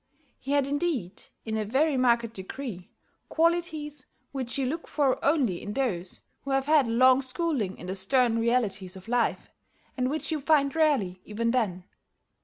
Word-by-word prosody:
He 275 - -3
had, 285 -2 +3
indeed, 280 - -1 0.2
in 220 -1 -2
a 215 - 0
very 275 +8 +1
marked 235 -3 +2
degree, 190 -1 -7 0.4
qualities 320 -4 0 0.2
which 260 -3 -2
you 270 - 0
look 320 +6 -3
for 280 -4 +1
only 265 - +2
in 205 - -5
those 195 -10 -2 0.2
who 275 - -8
have 270 0 +1
had 295 -3 +4
a - - -2
long 255 +3 +5
schooling 260 - -2
in - - -9
the 185 - -3
stern 230 +4 +2
realities 215 -6 0
of 190 +2 -12
life, 245 0 0 0.4
and 255 -1 0
which 310 +3 -2
you 310 -2 -1
find 280 -1 +3
rarely 265 - +1
even 230 +2 -1
then. 205 -8 0
255 Hz, 170 wpm, -27 LUFS, 215-285 Hz, 0.4 s, long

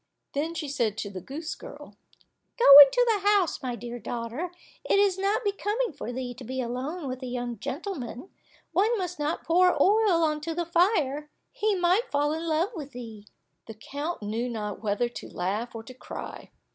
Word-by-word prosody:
Then 315 +4 -2
she 320 -3 -3
said 235 -7 -1
to 200 - -4
the 185 -2 -7
goose 305 - -6
girl, - - -11 0.6
"Go 480 - +2
into 290 - +8
the 415 - 0
house, 400 -5 +2
my 250 -2 -3
dear 240 0 -7
daughter, 240 - -4 0.3
it - - +2
is 395 -2 +3
not 410 +5 +1
becoming 415 +1 -1
for 245 - -6
thee 250 0 -4
to 250 +2 -11
be 260 +2 -5
alone 260 +7 -3
with 255 0 -5
a 255 - -5
young 245 -2 -4
gentleman; 275 - -5 0.4
one 415 +7 +2
must 360 -4 -4
not 295 +2 -2
pour 360 +2 +3
oil 405 -5 +4
on 305 -1 0
to 325 +1 -4
the 345 0 -1
fire, 320 -5 +1 0.2
he 435 -4 0
might 370 +7 +2
fall 290 +1 +1
in 325 +1 -4
love 330 +6 +1
with 290 -7 -8
thee." 225 -4 -9 0.4
The 225 - -8
count 285 +6 -5
knew 225 +4 -2
not 210 -4 -5
whether 215 +2 0
to 240 - -9
laugh 210 +7 -3
or 225 - -6
to 255 - -11
cry. 255 - -8
295 Hz, 190 wpm, -27 LUFS, 240-360 Hz, 0.6 s, into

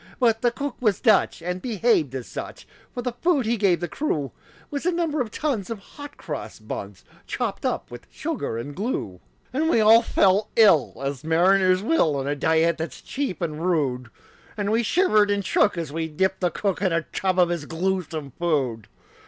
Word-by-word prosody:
But 225 -3 +3
the 245 - +3
cook 280 +3 -5
was 215 -6 +1
Dutch, 215 -7 +3
and 180 +1 -3
behaved 210 - +1
as 130 -2 -4
such; - - -8 0.2
For 245 - -5
the 250 - -1
food 330 -8 +2
that - - -1
he - - +3
gave 190 -6 +2
the 175 - -1
crew 150 - -2 0.4
Was 285 -1 -3
a - - +3
number 330 -4 0
of 235 - -2
tons 230 -6 -2
of 230 - -3
hot 290 +8 -12
cross 150 -4 -6
buns, 100 -3 -7 0.2
Chopped - - -2
up - - -3
with 120 - -10
sugar 305 - -4
and 140 +5 -6
glue. 185 - -3 0.3
And 310 +5 +1
we 280 - +3
all 220 +2 +7
felt 200 0 +2
ill 200 - +4
as 135 -1 -3
mariners 185 +3 +3
will, 210 - +2
On 135 -1 -2
a 145 +1 -1
diet 160 +3 +2
that's 160 - -5
cheap 270 -10 -3
and 155 -1 -3
rude; 135 -9 0 0.5
And 205 0 -1
we 225 +2 +3
shivered 215 - +3
and 200 -1 0
shook 200 +1 +2
as 160 -4 -4
we 165 0 -2
dipped 190 +5 0
the 180 - +1
cook 195 +2 -2
In 190 -3 +2
a 165 -1 +1
tub 185 +3 -2
of 180 -2 +4
his 170 -4 -3
gluesome 165 -4 -2
food. 135 -10 -1
185 Hz, 200 wpm, -24 LUFS, 155-230 Hz, 0.5 s, all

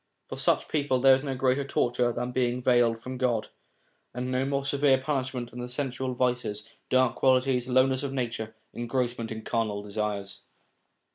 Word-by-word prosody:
For - - -5
such - - +2
people 145 -4 +1
there 135 +1 +7
is 130 +1 +1
no 135 -2 -2
greater 130 +2 +1
torture 125 -3 +1
than 125 +1 -3
being 125 0 0
veiled 120 -2 +4
from 125 +3 -7
God, 120 -4 0 0.7
and 125 +1 -3
no 130 +1 +1
more 140 0 -1
severe 140 -1 +3
punishment 130 -3 -3
than 125 +1 -6
sensual 130 0 -2
vices, 120 -4 -1 0.2
dark 130 -1 +3
qualities, 130 -1 +2
lowness 130 +1 +3
of 140 -2 -3
nature, 115 -4 -3 0.2
engrossment 120 -1 -2
in 110 0 -6
carnal 110 -3 -1
desires. 100 -2 -4
125 Hz, 160 wpm, -27 LUFS, 120-130 Hz, 0.7 s, there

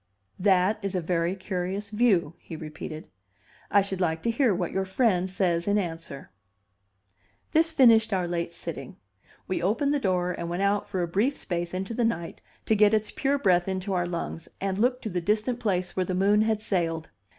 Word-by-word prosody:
"That 190 +2 +3
is 195 -2 -3
a - - +2
very 170 +1 0
curious 190 +2 -4
view," 205 -8 +2
he 165 - -9
repeated. 155 0 -7 0.6
"I 200 - +4
should 190 -1 -4
like 160 -2 0
to 235 - +2
hear 235 0 +3
what 175 -2 -1
your 190 - 0
friend 190 -2 +1
says 175 -2 0
in 205 +1 +3
answer." 165 - -5 1.2
This 325 +1 +3
finished 230 -7 +5
our 185 -3 0
late 170 -1 -2
sitting. 165 -6 -7 0.5
We 185 - -1
opened 235 - +1
the 290 - +1
door 180 -6 0
and 170 -1 -4
went 175 +3 -1
out 200 +1 +1
for 185 -3 -1
a - - -1
brief 215 +11 +1
space 175 -1 -3
into 190 +4 -4
the 240 - 0
night 200 -8 -2 0.2
to - - +2
get 210 +1 +5
its 215 0 -1
pure 280 +1 0
breath 180 -8 +3
into 190 +1 -2
our 175 -1 0
lungs, 170 -1 -5
and 195 0 -2
look 250 +3 +1
to 220 - -3
the 180 0 -1
distant 215 +6 0
place 185 -6 -1
where 185 - +1
the 185 - -1
moon 200 +3 +4
had 220 -1 0
sailed. 165 -5 -1
190 Hz, 195 wpm, -27 LUFS, 175-215 Hz, 1.2 s, finished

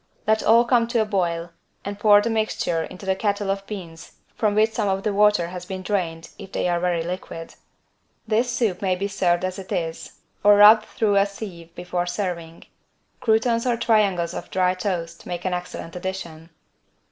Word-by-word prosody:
Let 220 +1 +2
all 230 +2 +5
come 235 -1 +3
to 235 -1 +1
a - - -5
boil 175 -4 -1 0.3
and 200 0 -5
pour 205 -1 +6
the 230 - -1
mixture 215 -6 -1
into 185 +2 -11
the 190 0 +1
kettle 200 0 -1
of 195 0 -4
beans 170 -6 -8 0.2
from 210 -2 0
which 215 +1 +3
some 220 -2 -1
of 195 0 -1
the 210 - 0
water 210 -4 +3
has 180 0 -7
been 190 -1 -5
drained, 170 -5 -2
if 195 -2 -10
they - - 0
are 175 -1 +1
very 175 -2 0
liquid. 170 -1 -6 0.7
This 230 +3 +1
soup 220 -7 -1
may 190 -2 +1
be 195 +2 -2
served 185 -3 +1
as 185 +1 -4
it 190 - -10
is 165 -1 -3 0.3
or 205 0 +7
rubbed 215 +1 +8
through 205 -3 +1
a 200 +1 +4
sieve 180 -5 -9
before 175 0 -3
serving. 175 -3 -4 0.6
Croutons 230 +1 +1
or 240 -1 +1
triangles 200 -7 +2
of - - -7
dry 185 -1 +2
toast 180 -3 -4
make 175 0 -5
an 185 - 0
excellent 180 -1 -6
addition. 175 -3 -6
190 Hz, 190 wpm, -23 LUFS, 175-210 Hz, 0.7 s, rubbed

